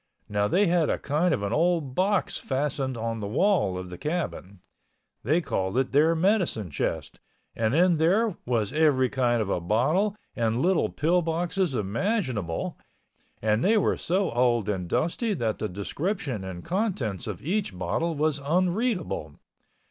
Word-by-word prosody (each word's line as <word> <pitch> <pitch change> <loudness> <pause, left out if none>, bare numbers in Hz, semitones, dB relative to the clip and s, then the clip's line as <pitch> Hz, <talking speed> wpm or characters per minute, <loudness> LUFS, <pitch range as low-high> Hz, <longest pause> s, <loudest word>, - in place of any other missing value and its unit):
Now, 105 0 0
they 195 - +3
had 170 -3 +2
a - - +1
kind 155 +5 0
of 100 - 0
an 100 - -1
old 165 -4 +1
box 190 +5 +1
fastened 135 -2 -2
on 115 0 -3
the 100 - -4
wall 120 - +2
of 90 0 -6
the 90 0 -9
cabin. 150 - -4 0.6
They 155 +9 +2
called 95 - -2
it 130 0 +1
their 155 +4 +4
medicine 170 - +1
chest - - -3 0.4
and 115 +3 0
in 175 0 +4
there 190 +6 +2
was 115 -3 -1
every 145 -5 +3
kind 120 -4 +1
of 100 - -6
a 90 - 0
bottle 150 - +1 0.2
and 115 0 0
little 180 +4 +2
pill 175 +4 +1
boxes 170 0 -1
imaginable 110 - -2 0.6
and 110 +1 +2
they 220 +3 +4
were 205 - +2
so 190 +3 0
old 120 -3 +2
and 95 -4 -2
dusty 205 - 0
that 115 -7 -2
the 110 - -2
description 130 - -3
and 95 -2 -7
contents 175 - -2
of - - -6
each 190 - -1
bottle 165 - -1
was 150 0 0
unreadable. 180 - -1
145 Hz, 160 wpm, -26 LUFS, 110-180 Hz, 0.6 s, their